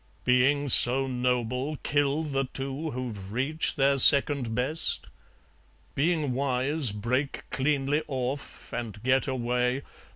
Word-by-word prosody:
Being 130 Hz, +3 st, +2 dB
so 130 Hz, +1 st, +5 dB
noble, 125 Hz, +2 st, -2 dB
kill 145 Hz, +1 st, 0 dB
the 135 Hz, -3 st, -2 dB
two 135 Hz, +4 st, -5 dB
Who've 115 Hz, -8 st, -7 dB
reached 135 Hz, +8 st, -1 dB
their 140 Hz, 0 st, +2 dB
second 140 Hz, -4 st, +6 dB
best? 135 Hz, +7 st, +1 dB, 0.8 s
Being 150 Hz, -2 st, 0 dB
wise, 135 Hz, 0 st, 0 dB
Break 125 Hz, +7 st, -3 dB
cleanly 140 Hz, +1 st, 0 dB
off, 135 Hz, 0 st, -5 dB
and 110 Hz, -4 st, -6 dB
get 130 Hz, +2 st, +1 dB
away. 125 Hz, 0 st, -1 dB
135 Hz, 110 wpm, -26 LUFS, 125-145 Hz, 0.8 s, second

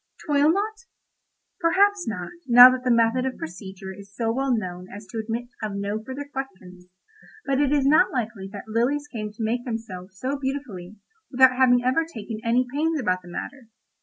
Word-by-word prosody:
"Toil 295 Hz, 0 st, +3 dB
not?" 430 Hz, +5 st, -3 dB, 0.7 s
Perhaps 390 Hz, +3 st, +2 dB
not, 180 Hz, -5 st, -4 dB, 0.2 s
now 245 Hz, +1 st, +10 dB
that 255 Hz, 0 st, -3 dB
the 255 Hz, -, 0 dB
method 230 Hz, +1 st, +3 dB
of 260 Hz, 0 st, -3 dB
procedure 190 Hz, +3 st, -8 dB
is 200 Hz, +1 st, -13 dB
so 225 Hz, 0 st, 0 dB
well 270 Hz, +3 st, -1 dB
known 185 Hz, -5 st, -3 dB
as 205 Hz, +2 st, -9 dB
to 210 Hz, +4 st, -6 dB
admit 230 Hz, +2 st, -4 dB
of 215 Hz, -2 st, -3 dB
no 200 Hz, +2 st, -3 dB
further 265 Hz, +4 st, -7 dB
question—but 265 Hz, -, -6 dB
it 285 Hz, -2 st, +2 dB
is 285 Hz, -2 st, +2 dB
not 315 Hz, +7 st, +4 dB
likely 225 Hz, -, -4 dB
that 205 Hz, 0 st, -9 dB
lilies 250 Hz, +7 st, 0 dB
came 215 Hz, -6 st, -5 dB
to 215 Hz, +2 st, -6 dB
make 240 Hz, +3 st, -1 dB
themselves 195 Hz, -6 st, -7 dB
so 270 Hz, +6 st, -3 dB
beautifully 255 Hz, -9 st, -5 dB, 0.3 s
without 260 Hz, -1 st, +5 dB
having 245 Hz, -1 st, +4 dB
ever 260 Hz, +6 st, +2 dB
taken 225 Hz, -8 st, -7 dB
any 240 Hz, +2 st, +2 dB
pains 315 Hz, +2 st, 0 dB
about 185 Hz, -7 st, 0 dB
the 180 Hz, -, -16 dB
matter. 255 Hz, +7 st, -7 dB
240 Hz, 180 wpm, -24 LUFS, 205-275 Hz, 0.7 s, now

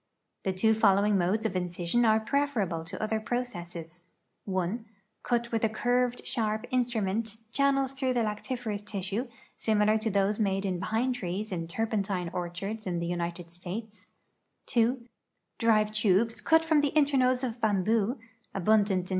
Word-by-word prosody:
The 190 Hz, -, +2 dB
two 220 Hz, +4 st, +3 dB
following 205 Hz, -1 st, +4 dB
modes 195 Hz, +4 st, +1 dB
of 190 Hz, -, -1 dB
incision 180 Hz, +5 st, 0 dB
are 220 Hz, 0 st, +5 dB
preferable 220 Hz, -, 0 dB
to 185 Hz, +2 st, -7 dB
other 215 Hz, 0 st, 0 dB
processes: 175 Hz, -8 st, -5 dB, 0.4 s
(1) 190 Hz, +4 st, -1 dB, 0.4 s
Cut 235 Hz, -1 st, -1 dB
with 225 Hz, -1 st, 0 dB
a 225 Hz, -, +4 dB
curved, 245 Hz, +2 st, 0 dB
sharp 215 Hz, -1 st, -1 dB
instrument 225 Hz, -3 st, 0 dB
channels 275 Hz, 0 st, +2 dB
througli 260 Hz, -2 st, 0 dB
the 240 Hz, -, +2 dB
lactiferous 215 Hz, 0 st, -3 dB
tissues 205 Hz, +3 st, -3 dB, 0.3 s
similar 215 Hz, 0 st, +2 dB
to 220 Hz, +1 st, -1 dB
tliose 200 Hz, +1 st, +1 dB
made 195 Hz, -2 st, +1 dB
in 185 Hz, -2 st, -1 dB
pine 230 Hz, +6 st, 0 dB
trees 205 Hz, -2 st, -4 dB
in 165 Hz, -3 st, -3 dB
turpentine 195 Hz, -3 st, -1 dB
orchards 185 Hz, +5 st, -4 dB
in 175 Hz, -1 st, -1 dB
the 170 Hz, -, -2 dB
United 170 Hz, 0 st, -3 dB
States; 205 Hz, +5 st, -7 dB, 0.6 s
(2) 240 Hz, 0 st, +1 dB, 0.5 s
drive 215 Hz, -2 st, +3 dB
tubes 215 Hz, +1 st, +2 dB
cut 325 Hz, 0 st, +4 dB
from 315 Hz, -2 st, +4 dB
tlie 290 Hz, 0 st, -1 dB
internodes 265 Hz, -4 st, +3 dB
of 240 Hz, -1 st, -3 dB
bamboo 215 Hz, +3 st, +2 dB, 0.4 s
(abundant 195 Hz, -1 st, +2 dB
in. -, -, -10 dB
215 Hz, 150 wpm, -29 LUFS, 190-240 Hz, 0.6 s, are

